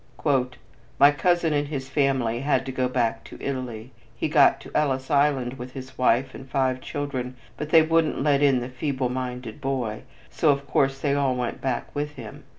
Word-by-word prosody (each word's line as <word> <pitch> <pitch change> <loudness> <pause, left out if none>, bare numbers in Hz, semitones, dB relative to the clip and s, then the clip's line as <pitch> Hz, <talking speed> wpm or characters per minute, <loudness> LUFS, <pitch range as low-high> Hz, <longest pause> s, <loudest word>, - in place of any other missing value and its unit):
"My 140 +1 +7
cousin 175 +1 +1
and 145 0 0
his 135 -3 -4
family 130 -4 +1
had 135 -1 +1
to 135 - -4
go 130 -1 0
back 115 -2 0
to - - -11
Italy. 125 -3 -5 0.2
He - - -2
got 145 -2 +5
to - - -12
Ellis 135 -2 0
Island 135 -3 +2
with 125 +1 -8
his 130 -1 -9
wife 130 +1 +2
and 135 - -10
five 130 -1 0
children, 130 -3 -4 0.2
but 150 +1 -5
they 160 0 +7
wouldn't 160 -3 +1
let 145 -1 +3
in 135 -3 +4
the 120 - -5
feeble 130 0 -2
minded 125 0 -5
boy, 125 -6 -2 0.3
so 155 - +2
of 140 -1 +2
course 135 0 +1
they 140 0 0
all 140 -2 +1
went 125 -1 -3
back 130 -2 -3
with 150 0 -3
him. - - -10
135 Hz, 190 wpm, -25 LUFS, 125-145 Hz, 0.3 s, My